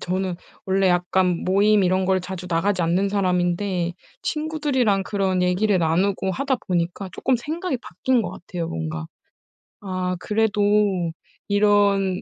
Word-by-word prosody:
저는 185 Hz, 0 st, -2 dB, 0.3 s
원래 190 Hz, 0 st, +2 dB
약간 180 Hz, 0 st, +1 dB
모임 200 Hz, +2 st, +4 dB
이런 185 Hz, +1 st, +2 dB
걸 190 Hz, 0 st, +2 dB
자주 180 Hz, 0 st, -7 dB
나가지 180 Hz, +2 st, +1 dB
않는 180 Hz, +4 st, +1 dB
사람인데 180 Hz, -2 st, 0 dB, 0.3 s
친구들이랑 290 Hz, -10 st, 0 dB
그런 190 Hz, -2 st, 0 dB
얘기를 185 Hz, +3 st, +2 dB
나누고 190 Hz, +4 st, +1 dB
하다 265 Hz, +4 st, 0 dB
보니까 175 Hz, +2 st, -1 dB
쪼끔 260 Hz, -, 0 dB
생각이 315 Hz, +3 st, -3 dB
바뀐 255 Hz, -1 st, 0 dB
것 -, -, -4 dB
같아요, 175 Hz, -2 st, -6 dB
뭔가. 80 Hz, -1 st, -4 dB, 0.7 s
아, 185 Hz, -2 st, -3 dB
그래도 210 Hz, +1 st, 0 dB, 0.9 s
이런 200 Hz, -2 st, +3 dB
190 Hz, 290 characters per minute, -23 LUFS, 180-205 Hz, 0.9 s, 모임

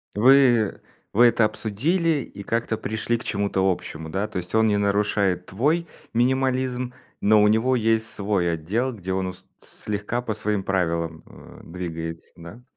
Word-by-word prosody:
Вы 120 Hz, -1 st, +5 dB, 0.3 s
вы 120 Hz, +4 st, +5 dB
это 115 Hz, -1 st, +3 dB
обсудили 150 Hz, -, 0 dB
и 100 Hz, -, -10 dB
как-то 115 Hz, 0 st, -1 dB
пришли 110 Hz, +2 st, -2 dB
к 115 Hz, -, -10 dB
чему-то 100 Hz, -2 st, 0 dB
общему, 80 Hz, -2 st, -6 dB
да? 95 Hz, +5 st, -2 dB
То 105 Hz, -3 st, -6 dB
есть 90 Hz, 0 st, -6 dB
он 110 Hz, 0 st, +4 dB
не 105 Hz, -, +2 dB
нарушает 100 Hz, -3 st, +1 dB
твой 155 Hz, -, 0 dB, 0.3 s
минимализм, 125 Hz, 0 st, 0 dB, 0.3 s
но 105 Hz, +1 st, +5 dB
у 105 Hz, -, +5 dB
него 110 Hz, +5 st, +3 dB
есть 115 Hz, -1 st, +1 dB
свой 100 Hz, -4 st, 0 dB
отдел, 110 Hz, +11 st, -1 dB
где 95 Hz, -3 st, -4 dB
он 95 Hz, 0 st, -1 dB
ус 90 Hz, 0 st, -9 dB
слегка 105 Hz, +3 st, -4 dB
по 115 Hz, -3 st, -3 dB
своим 105 Hz, -1 st, -2 dB
правилам, 85 Hz, -4 st, -1 dB
э, -, -, -14 dB
двигается, 80 Hz, -1 st, -6 dB
да? 85 Hz, +9 st, -12 dB
105 Hz, 160 wpm, -24 LUFS, 95-120 Hz, 0.3 s, Вы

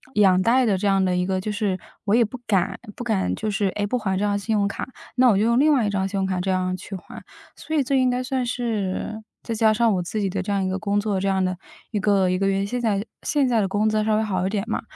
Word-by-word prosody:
养 190 Hz, -3 st, +5 dB
贷 250 Hz, +5 st, +3 dB
的 210 Hz, -4 st, +2 dB
这 205 Hz, -, 0 dB
样 195 Hz, -1 st, +3 dB
的 180 Hz, -, +1 dB
一 180 Hz, 0 st, 0 dB
个， 190 Hz, -1 st, 0 dB
就 210 Hz, +3 st, -3 dB
是 205 Hz, -3 st, -1 dB, 0.3 s
我 205 Hz, -, +3 dB
也 235 Hz, 0 st, +4 dB
不 230 Hz, +4 st, -8 dB
敢 195 Hz, -4 st, +1 dB, 0.2 s
不 -, -, -6 dB
敢， 215 Hz, -5 st, 0 dB
就 215 Hz, 0 st, -3 dB
是， 200 Hz, -1 st, 0 dB
诶， 205 Hz, -, 0 dB
不 245 Hz, +4 st, -1 dB
还 190 Hz, -3 st, -1 dB
这 205 Hz, -, 0 dB
张 205 Hz, 0 st, +1 dB
信 220 Hz, +2 st, -1 dB
用 200 Hz, -1 st, +2 dB
卡， 200 Hz, -, -5 dB, 0.3 s
那 255 Hz, 0 st, +5 dB
我 200 Hz, -, +4 dB
就 210 Hz, -, +2 dB
用 235 Hz, +2 st, +3 dB
另 305 Hz, +2 st, +5 dB
外 260 Hz, -6 st, +3 dB
一 205 Hz, -, 0 dB
张 190 Hz, -1 st, 0 dB
信 195 Hz, +1 st, -4 dB
用 190 Hz, -, +1 dB
卡 185 Hz, -1 st, -1 dB
这 190 Hz, -, -2 dB
样 185 Hz, 0 st, 0 dB
去 195 Hz, +2 st, -8 dB
还。 185 Hz, -, -10 dB, 0.3 s
所 315 Hz, -, -5 dB
以 285 Hz, -, +3 dB
这 270 Hz, +2 st, -2 dB
应 255 Hz, -, +3 dB
该 250 Hz, +1 st, -1 dB
算 255 Hz, 0 st, -1 dB
是 220 Hz, -3 st, -2 dB, 0.2 s
再 230 Hz, -, -3 dB
加 220 Hz, 0 st, +3 dB
上 225 Hz, 0 st, +3 dB
我 180 Hz, -, 0 dB
自 175 Hz, +5 st, -4 dB
己 200 Hz, -, 0 dB
的 185 Hz, -, -2 dB
这 205 Hz, -, -4 dB
样 200 Hz, -1 st, +1 dB
一 185 Hz, -, 0 dB
个 190 Hz, +1 st, -2 dB
工 205 Hz, 0 st, 0 dB
作， 205 Hz, -2 st, -1 dB
这 195 Hz, -, -1 dB
样 190 Hz, -1 st, +1 dB
的 185 Hz, 0 st, -1 dB, 0.4 s
1 210 Hz, -, -1 dB
个 195 Hz, -2 st, +2 dB
1 185 Hz, -, 0 dB
个 195 Hz, -, +1 dB
月， 195 Hz, 0 st, 0 dB
现 245 Hz, +4 st, -3 dB
在 210 Hz, -2 st, 0 dB, 0.2 s
现 285 Hz, -3 st, +1 dB
在 235 Hz, -3 st, +2 dB
的 195 Hz, -, +1 dB
工 205 Hz, +3 st, +1 dB
资 215 Hz, 0 st, +1 dB
稍 215 Hz, 0 st, +2 dB
微 215 Hz, -, +1 dB
好 185 Hz, -4 st, -1 dB
一 -, -, -1 dB
点 205 Hz, -1 st, -1 dB
嘛。 -, -, -2 dB
205 Hz, 320 characters per minute, -23 LUFS, 190-225 Hz, 0.4 s, 养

